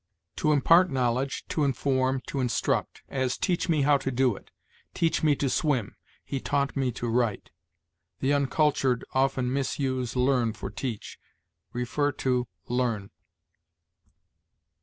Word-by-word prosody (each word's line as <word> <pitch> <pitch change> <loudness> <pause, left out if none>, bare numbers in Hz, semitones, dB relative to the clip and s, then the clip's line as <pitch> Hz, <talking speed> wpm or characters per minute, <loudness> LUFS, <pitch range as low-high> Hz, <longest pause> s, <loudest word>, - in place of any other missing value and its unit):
To 155 - +2
impart 165 +5 +5
knowledge, 130 0 -1
to 155 - 0
inform, 130 -1 +1
to 140 - -4
instruct; 125 -3 -1
as, 130 -2 -1
"Teach 180 -1 0
me 155 -4 +3
how 145 0 +5
to 135 - -2
do 130 -3 +2
it"; - - -14 0.5
"Teach 165 -1 +1
me 150 -2 +4
to 140 - -1
swim"; 130 -5 0 0.3
"He 135 - -3
taught 140 0 -1
me 135 -2 0
to 120 - -4
write." 115 -3 0 0.7
The 135 +2 +1
uncultured 140 -3 +1
often 130 -1 +1
misuse 130 -2 -1
learn 125 -3 +2
for 105 - -7
teach. 110 0 -5 0.6
See 125 +4 0 0.6
LEARN. 120 -5 -1
130 Hz, 130 wpm, -27 LUFS, 125-140 Hz, 0.7 s, impart